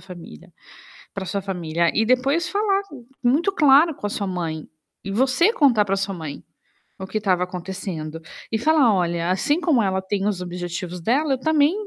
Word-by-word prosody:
família 175 - -12 0.6
para 195 -1 -5
sua 195 +2 -3
família. 170 -3 -1
E 220 - +1
depois 270 +7 +1
falar, 400 -1 +1 0.4
muito 285 +10 +2
claro 295 -1 +5
com - - -5
a - - -3
sua 200 -1 -3
mãe 165 -4 -4 0.3
e 195 - -6
você 260 - +3
contar 265 - +4
para 195 -1 -1
sua 195 0 -2
mãe 155 -5 -7 0.6
o 190 - -6
que 215 +2 -3
tava 185 -3 +1
acontecendo 180 -3 -6 0.3
e 225 - +1
falar: 285 -3 +4
"Olha, 170 -2 0
assim 290 - +1
como 305 -9 +3
ela 190 -2 0
tem 195 +1 -2
os 195 -3 -2
objetivos 175 0 -5
dela, 270 - +1
eu 260 - -2
também 310 +2 +3
200 Hz, 175 wpm, -22 LUFS, 180-270 Hz, 0.6 s, claro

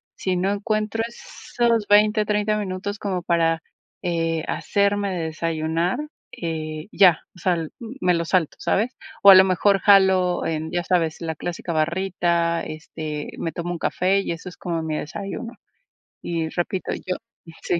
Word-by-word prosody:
si 185 -1 -1
no 185 +2 +1
encuentro 215 +1 -1
esos 235 -1 -2
20, 210 +1 +4
30 210 0 +1
minutos 205 +1 -4
como 185 -3 -2
para, 165 -1 +1 0.4
eh, 165 -3 -1
hacerme 200 -1 +1
de 170 - -2
desayunar, 165 +4 -1 0.4
eh, 155 -1 -4
ya, 180 -5 +5
o - - -15
sea, 170 -3 0
me 230 -6 -1
lo 170 - -1
salto, 170 -2 +1
¿sabes?, 230 +6 0 0.3
o 200 - +10
a 195 - +12
lo 190 - +9
mejor 195 +2 +3
jalo 190 -3 +4
en, 160 0 -2
ya 175 0 -1
sabes, 165 -2 0
la 160 -1 -3
clásica 170 +2 -5
barrita, 170 0 0
este, 155 -1 -6
me 165 - -3
tomo 175 +1 -4
un 175 - -3
café 190 +4 +1
y 195 - -2
eso 170 +2 -8
es - - -14
como 170 -2 -3
mi 155 -1 -2
desayuno, 200 +9 -5 0.7
y 165 -2 -2
repito, 180 +2 -2
yo 185 0 -4 0.5
sí, 175 - 0
180 Hz, 160 wpm, -23 LUFS, 165-200 Hz, 0.7 s, a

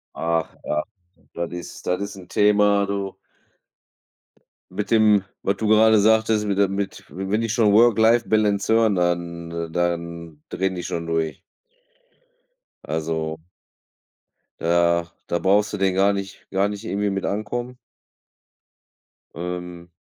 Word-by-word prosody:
Ach 85 0 -1
was. 75 0 -1 0.5
Das 85 0 -4
ist 90 0 -8
das 90 +2 0
ist 100 - -5
'n 95 -2 -12
Thema, 105 0 +3
du. 100 -1 -4 1.5
Mit 100 +3 -4
dem, 105 -3 +5 0.2
was 100 - +1
du 110 - -2
gerade 110 0 +6
sagtest, 110 0 +3
mit 100 -2 -1
der 100 0 +4
mit 100 +1 -4
wenn 95 +6 -2
die 115 - -1
schon 110 -1 +3
Work 115 +1 +5
Life 115 +2 +4
Balance 105 -1 +2
hören, 110 -2 +3
dann, 85 -1 -2
äh 85 -1 -4
dann 85 -2 -3
drehen 95 0 -1
die 90 - -5
schon 85 -1 -4
durch. 80 -1 -2 1.4
Also 80 0 -3 1.2
da 85 0 +2 0.2
da 85 - 0
brauchst 105 +4 +2
du - - -2
den 95 -1 +1
gar 100 +1 +3
nicht 100 -1 -6
gar 95 +1 +2
nicht 105 +1 -6
irgendwie 100 0 -1
mit 95 0 -2
ankommen. 120 +5 -3 1.6
Ähm 90 0 -6
95 Hz, 140 wpm, -23 LUFS, 85-105 Hz, 1.6 s, gerade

